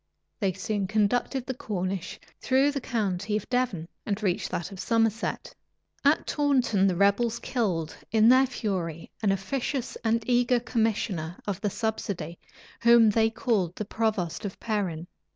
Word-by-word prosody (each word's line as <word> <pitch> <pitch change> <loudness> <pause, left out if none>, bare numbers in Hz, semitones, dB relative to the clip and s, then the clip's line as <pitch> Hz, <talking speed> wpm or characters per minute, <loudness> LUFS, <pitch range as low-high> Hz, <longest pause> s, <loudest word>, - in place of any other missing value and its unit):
They 195 -4 +1
soon 195 +1 -2
conducted 240 +5 +1
the 260 - -3
Cornish 190 -5 -4 0.2
through 265 +2 +3
the 280 -1 -3
county 210 -3 -1
of 210 - -6
Devon, 245 -10 0 0.2
and 210 0 -3
reached 185 -4 0
that 170 - -3
of 195 - -9
Somerset. 225 +2 0 0.5
At 290 +2 +3
Taunton, 255 -9 +2
the 185 - +1
rebels 200 +5 +2
killed, 180 - -2 0.2
in 220 0 +5
their 260 +2 +6
fury, 180 - -3
an 205 -3 +3
officious 250 +6 -2
and 225 0 +1
eager 245 0 +3
commissioner 215 -8 -1
of 200 -2 -3
the 210 - +1
subsidy, 195 -5 -3 0.4
whom 235 -2 +7
they 225 +1 +3
called 215 -7 0
the 215 - -4
provost 210 -6 -1
of 200 -2 -5
Perin. 190 -7 -2
215 Hz, 150 wpm, -27 LUFS, 190-235 Hz, 0.5 s, whom